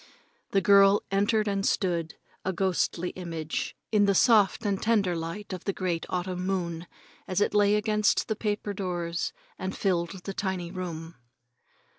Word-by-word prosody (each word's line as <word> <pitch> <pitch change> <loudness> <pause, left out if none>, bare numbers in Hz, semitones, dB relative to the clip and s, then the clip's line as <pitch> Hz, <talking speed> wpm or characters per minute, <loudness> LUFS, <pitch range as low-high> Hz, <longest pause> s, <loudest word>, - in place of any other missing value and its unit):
The 195 - +2
girl 200 0 +6
entered 205 +2 +2
and 200 -1 0
stood, 170 -5 0 0.3
a 190 - 0
ghostly 180 -1 0
image, 165 -4 -4 0.2
in 210 -2 +4
the 200 -1 +3
soft 215 0 +4
and 200 -2 0
tender 205 -6 +2
light 170 +5 -5
of 185 - -7
the 195 - 0
great 175 -3 -2
autumn 180 0 -2
moon 175 -3 -2 0.4
as 185 0 0
it 205 - +1
lay 205 0 +4
against 210 0 +2
the 220 - -1
paper 210 -1 -2
doors 175 -2 -2 0.3
and 190 +1 -4
filled 180 -1 -1
the 195 - -5
tiny 185 -3 -3
room. 170 -4 -6
190 Hz, 155 wpm, -28 LUFS, 175-205 Hz, 0.4 s, girl